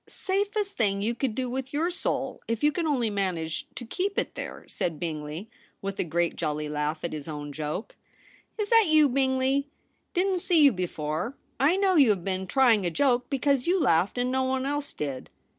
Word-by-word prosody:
* - - -52
Safest 400 +1 -1
thing 200 -4 +1
you 230 +3 +1
could 235 -2 -2
do 255 0 -1
with 260 +1 -4
your 325 +5 +1
soul, 355 - -2
if 230 +2 -2
you 295 - +5
can 330 +1 -1
only 245 -7 +1
manage 180 -5 -2
to 245 - -6
keep 385 - -2
it - - -1
there,' - - -7
said 165 -4 -2
Bingley, 155 +3 -4 0.3
with 195 0 -5
a - - +2
great 170 0 0
jolly 150 -1 -2
laugh 150 +1 -2
at 170 - -3
his 150 -1 -6
own 145 -2 -5
joke. 155 +7 -4 0.3
* - - -29
Is 420 -2 -2
that 455 -4 +6
you, 310 -1 +6
Bingley? 265 +1 +1 0.5
Didn't 370 0 +1
see 345 -2 +3
you 280 - +8
before. 180 - -3 0.2
I 290 +7 +4
know 385 -2 +3
you 275 -6 +7
have 195 -5 +1
been 190 0 -2
trying 235 -4 +4
a 175 - +1
joke, 250 +5 +1
because 275 0 +1
you 370 +2 +3
laughed 185 - +2
and 250 +1 0
no 260 0 +1
one 260 0 0
else 290 +1 -2
did.' 140 -3 -5
245 Hz, 210 wpm, -27 LUFS, 170-290 Hz, 0.5 s, you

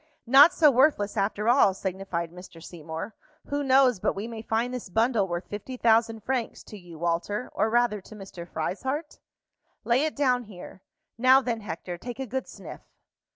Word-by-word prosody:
"Not 275 +7 +8
so 305 -5 +5
worthless 250 -6 +2
after 210 +1 -1
all," 235 -6 +4
signified 185 -3 -4
Mr. 180 -1 -13
Seymour. 165 +4 -8 0.4
"Who 285 0 -1
knows 260 -5 +4
but - - -1
we 200 +3 -5
may 230 -2 -7
find 230 +3 -1
this 250 -6 -6
bundle 225 0 +1
worth 175 0 -4
fifty 215 +5 -7
thousand 225 -1 +2
francs 250 -2 -3
to 210 - -11
you, 175 -3 -13
Walter, 170 +8 -2
or 220 - +1
rather 235 -3 +1
to 215 - -14
Mr. 190 -4 -10
Frieshardt? 265 - -4 0.6
Lay 245 +4 +2
it 315 - -2
down 250 -4 +1
here. 190 -2 -12 0.4
Now 260 +2 +6
then, 240 -4 -3
Hector, 175 -3 -7
take 245 +3 -7
a 265 - -4
good 260 +2 -4
sniff." - - -11
225 Hz, 175 wpm, -26 LUFS, 190-255 Hz, 0.6 s, Not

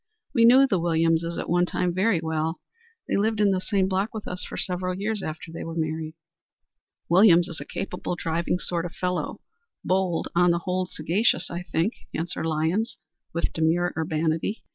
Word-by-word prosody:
We 230 -4 +5
knew 260 +3 +8
the 195 -9 +1
Williamses 165 0 +1
at - - -3
one 175 +1 +2
time 180 -1 -1
very 190 0 +2
well. 160 0 -2 0.5
They - - 0
lived 215 +1 +1
in 205 -1 +4
the 185 -1 0
same 190 -1 +1
block 195 +4 -1
with 215 - -6
us 180 0 -4
for - - -7
several 180 0 -2
years 210 +1 -2
after 160 -1 -6
we - - -5
were 165 0 -6
married." 160 0 -3 0.9
"Williams 175 -1 +6
is 165 - -7
a - - -6
capable, 180 -2 -4
driving 170 +1 -1
sort 175 -1 -2
of 175 - -13
fellow. 180 0 -2 0.4
Bold, 185 -2 +1
but 175 - +3
on 180 - +5
the 170 - +3
whole 185 0 0
sagacious, 175 +8 +1
I 170 +1 -3
think," 180 +4 0 0.2
answered 165 0 -2
Lyons, 165 +8 0 0.3
with 170 - -1
demure 165 +2 +1
urbanity. 160 +5 -1
175 Hz, 185 wpm, -25 LUFS, 165-190 Hz, 0.9 s, knew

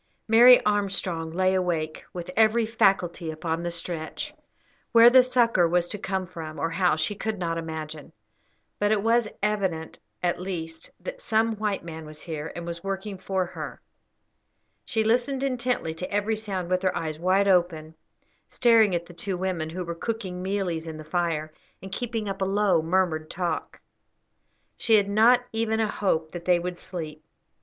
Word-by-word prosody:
Mary 240 +3 +8
Armstrong 195 -5 0
lay 185 +3 +1
awake, 170 -4 -1
with 175 0 -6
every 225 +1 +4
faculty 190 -6 +1
upon 160 +1 -3
the 175 - -2
stretch. 170 -2 -4 0.6
Where 235 +1 +9
the 260 0 +8
succour 235 -8 +3
was 175 +1 +1
to 210 - -4
come 190 -1 -2
from, 165 -3 -8
or 165 - -1
how, 180 0 +2
she 155 +6 -1
could 215 +1 -3
not 165 -2 -2
imagine; 160 -2 -6 0.7
but 205 0 +2
it 210 -2 +2
was 230 0 +3 0.2
evident, 190 -6 -1 0.2
at 175 0 0
least, 165 -3 -5
that - - -7
some 225 0 +1
white 210 -3 -2
man 160 -2 -8
was 155 0 -11
here, 160 -2 -5
and 170 - -6
was 170 0 -6
working 195 0 -4
for 190 -1 -1
her. - - -7 1.1
She 220 -1 0
listened 245 +4 +1
intently 250 -10 -1
to 170 +3 -6
every 205 +2 +1
sound, 195 -5 -4
with 185 0 +2
her 185 -1 0
eyes 155 -1 -4
wide 190 +3 +3
open, 170 -4 +1 0.6
staring 225 -6 +4
at 170 0 -2
the 175 - -13
two 190 +1 -4
women, 180 -4 -2
who 180 +3 -4
were 170 - -3
cooking 185 -1 -4
mealies 185 -4 -2
in 160 -1 -6
the 155 - -8
fire, 155 -2 -2 0.3
and 190 +1 -10
keeping 225 0 -3
up 195 0 -4
a - - +2
low, 195 -3 +2
murmured 160 -2 0
talk. 175 -1 -3 1.0
She 225 - +3
had 205 -2 +4
not 225 +5 +5
even 225 0 0
a 220 - +2
hope 160 -7 0
that 175 -1 -7
they 180 -1 +4
would 175 0 -4
sleep. 155 -4 -7
185 Hz, 175 wpm, -26 LUFS, 165-210 Hz, 1.1 s, Where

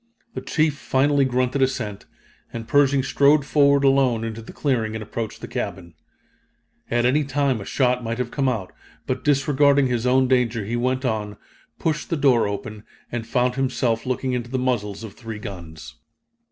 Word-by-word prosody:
The - - -5
chief 155 -2 +1
finally 140 +1 +2
grunted 130 +1 0
assent, 110 -6 -2 0.4
and 115 -1 -6
Pershing 140 -1 +3
strode 140 +1 +3
forward 140 -1 +4
alone 135 -4 +3
into 115 0 -5
the 110 - -11
clearing 115 -6 -1
and 110 - -4
approached 110 0 -5
the - - -6
cabin. 85 -3 -5 1.0
At 120 0 +1
any 145 +5 +3
time 140 -4 0
a - - -7
shot 125 0 +1
might 115 0 -3
have 125 -1 -3
come 135 -2 +1
out, 110 -7 -4 0.3
but 130 0 -3
disregarding 140 -1 +3
his 125 -1 0
own 130 +1 +4
danger 120 -4 +1
he 115 +4 -3
went 130 +2 0
on, 105 -4 -2 0.4
pushed 155 -2 -2
open 165 - 0
the - - -8
door, 110 -5 +2 0.4
and 115 -1 -4
found 125 +1 +1
himself 125 -3 -1
looking 130 0 -1
into 120 -1 -3
the 130 - -2
muzzles 115 -5 -2
of 110 -3 -8
three 115 -3 -8
guns. 85 -7 -9
125 Hz, 175 wpm, -23 LUFS, 115-135 Hz, 1.0 s, forward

